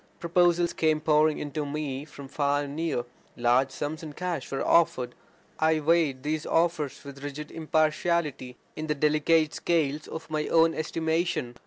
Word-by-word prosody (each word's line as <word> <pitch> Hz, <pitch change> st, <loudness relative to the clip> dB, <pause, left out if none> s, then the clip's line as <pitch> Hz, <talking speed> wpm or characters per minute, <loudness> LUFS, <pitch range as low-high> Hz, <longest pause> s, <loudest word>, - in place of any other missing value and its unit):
Proposals 175 Hz, 0 st, +2 dB
came 155 Hz, -1 st, +2 dB
pouring 155 Hz, 0 st, +3 dB
in 145 Hz, -, -5 dB
to 150 Hz, +2 st, -2 dB
me 145 Hz, -1 st, -4 dB
from 140 Hz, -3 st, -11 dB
far 145 Hz, +1 st, 0 dB
and 140 Hz, 0 st, -7 dB
near; 155 Hz, -7 st, -1 dB, 0.3 s
large 120 Hz, +3 st, +3 dB
sums 145 Hz, +4 st, -4 dB
in 155 Hz, -2 st, -8 dB
cash 175 Hz, -4 st, -4 dB
were 135 Hz, -, -2 dB
offered. 125 Hz, -7 st, +3 dB, 0.5 s
I 160 Hz, 0 st, +3 dB
weighed 155 Hz, -4 st, +2 dB
these 155 Hz, +1 st, -1 dB
offers 165 Hz, -4 st, 0 dB
with 140 Hz, 0 st, -10 dB
rigid 145 Hz, +1 st, -6 dB
impartiality, 155 Hz, -4 st, 0 dB, 0.2 s
in 155 Hz, 0 st, -5 dB
the 150 Hz, -, 0 dB
delicate 155 Hz, +1 st, +2 dB
scales 155 Hz, -3 st, 0 dB
of 160 Hz, -, -7 dB
my 155 Hz, -1 st, -1 dB
own 165 Hz, 0 st, +4 dB
estimation. 160 Hz, -4 st, -1 dB
155 Hz, 160 wpm, -27 LUFS, 140-165 Hz, 0.5 s, own